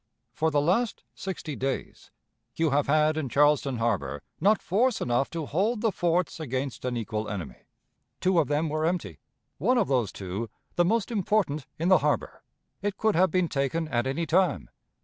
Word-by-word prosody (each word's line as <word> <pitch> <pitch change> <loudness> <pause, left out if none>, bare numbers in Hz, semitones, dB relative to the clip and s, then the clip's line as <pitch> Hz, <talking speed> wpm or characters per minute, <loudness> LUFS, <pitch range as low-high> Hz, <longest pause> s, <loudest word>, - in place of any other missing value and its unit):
For 160 +1 +1
the 145 -2 +2
last 205 +8 +1
sixty 175 -6 -5
days, 135 0 -4 0.5
you 160 -2 +1
have 145 +1 +2
had 155 +1 +3
in 150 -5 -2
Charleston 145 -1 +3
Harbor 90 - -1 0.2
not 205 +1 +4
force 235 +6 +1
enough 120 +3 0
to 165 -2 -4
hold 210 +10 0
the 225 -2 +2
forts 175 -2 0
against 135 -3 -3
an 125 -1 -1
equal 110 -1 -3
enemy. 80 - -7 0.5
Two 185 -2 +3
of 150 - +2
them 150 +3 +1
were 155 +1 -1
empty; 160 - -2 0.4
one 245 - +3
of 225 - +2
those 125 -7 +1
two, 100 +4 -5 0.3
the 175 - +4
most 220 +5 +1
important 195 - 0
in 170 +3 0
the 185 - +7
harbor. - - -1 0.4
It 205 -2 -2
could 220 -1 +2
have 185 +3 +4
been 180 +1 +1
taken 155 +3 -1
at 120 -1 0
any 160 +6 -1
time. 180 +3 +1
155 Hz, 180 wpm, -27 LUFS, 130-185 Hz, 0.5 s, the